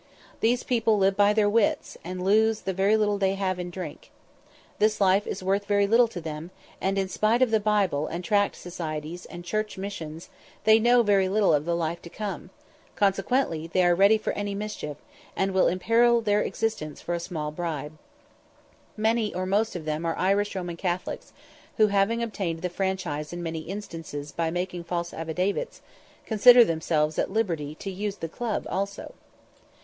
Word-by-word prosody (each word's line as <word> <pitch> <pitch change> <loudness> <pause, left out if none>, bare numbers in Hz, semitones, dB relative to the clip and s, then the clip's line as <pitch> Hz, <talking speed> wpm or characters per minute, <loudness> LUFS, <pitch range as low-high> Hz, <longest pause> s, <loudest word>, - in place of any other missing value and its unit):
These 240 +2 +2
people 225 -3 +2
live 195 0 +3
by 205 0 +5
their 210 -1 +3
wits, 210 0 +1
and 180 +1 -5
lose 220 +2 +3
the 190 - -2
little 205 +2 +2
they 195 0 +1
have 190 -2 -1
in 180 0 -4
drink. 175 -3 -8 0.7
This 215 0 +2
life 195 +1 +3
is - - -4
worth 195 +2 0
very 200 -1 +3
little 230 +4 +5
to 210 -6 -7
them; 160 0 -6 0.3
and 195 +1 0
in 195 -1 0
spite 220 +6 +2
of 220 -4 +1
Bible 195 -8 +1
and 175 +2 -5
Tract 205 +2 +2
societies, 165 -1 -6
and 175 -1 -9
church 215 +2 -2
missions, 170 -5 -6 0.3
they 220 +1 +6
know 240 +1 +5
very 195 -3 +3
little 200 -3 +3
of 150 0 +1
the 170 0 0
life 170 0 -2
to 170 - -10
come; 195 -2 -6 0.5
consequently 195 - +1
they 180 +2 +2
are 175 - +5
ready 200 +5 +5
for 215 - -3
any 205 -1 -3
mischief, 200 -8 -5 0.4
and 195 0 0
will 190 0 +3
imperil 230 +6 +3
their 210 -1 +2
existence 215 -10 -3
for 175 - -4
a 170 - -1
small 155 -3 -4
bribe. 155 -2 -4 1.0
Many 220 0 +1
or 185 +1 -2
most 205 +3 0
of 165 -3 -5
them 155 +1 -2
are 165 -1 -1
Irish 200 +2 +1
Roman 175 -2 -4
Catholics, 180 0 -3 0.5
who, 215 -2 +5
having 200 +4 +1
obtained 185 -7 -3
the 180 - 0
franchise 180 -6 -2
in 175 0 -5
many 165 -1 -3
instances 165 -5 -7
by 165 +1 -1
making 180 0 -3
false 170 0 -3
affidavits, 180 - -2 0.5
consider 240 +2 +7
themselves 160 -2 0
at - - 0
liberty 165 -8 -1
to 195 +4 -6
use 200 +1 -3
the 165 - -5
club 225 +6 -3
also. 200 +1 -4
190 Hz, 175 wpm, -26 LUFS, 170-210 Hz, 1.0 s, consider